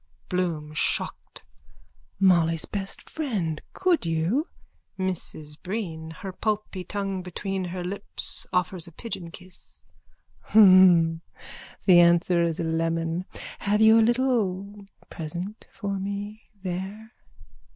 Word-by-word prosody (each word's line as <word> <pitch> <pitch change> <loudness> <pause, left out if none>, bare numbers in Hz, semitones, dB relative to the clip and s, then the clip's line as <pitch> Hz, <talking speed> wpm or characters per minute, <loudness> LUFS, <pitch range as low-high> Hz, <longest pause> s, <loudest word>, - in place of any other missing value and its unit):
BLOOM: 165 -5 -2
(Shocked.) 150 - -1 0.8
Molly's 170 -4 +3
best 195 -1 -5
friend! 200 - -2
Could 365 -3 +2
you? 170 - 0 0.5
MRS 165 -5 -2
BREEN: 175 -5 -4
(Her 185 +4 -7
pulpy 210 -2 -2
tongue 195 -1 -3
between 190 +1 -4
her 180 0 -5
lips, 200 +3 -1
offers 180 -1 0
a - - -11
pigeon 180 -2 -6
kiss.) 185 +2 -4 0.7
Hnhn. 185 -5 +7 0.6
The 180 -3 +7
answer 170 0 +4
is 165 -1 0
a - - 0
lemon. 165 +1 -1 0.3
Have 210 +1 +1
you 220 +1 +7
a - - +6
little 210 -5 0 0.2
present 175 +6 -6
for 200 -2 -4
me 200 +2 -6
there? 190 +5 -5
185 Hz, 110 wpm, -26 LUFS, 170-205 Hz, 0.8 s, Hnhn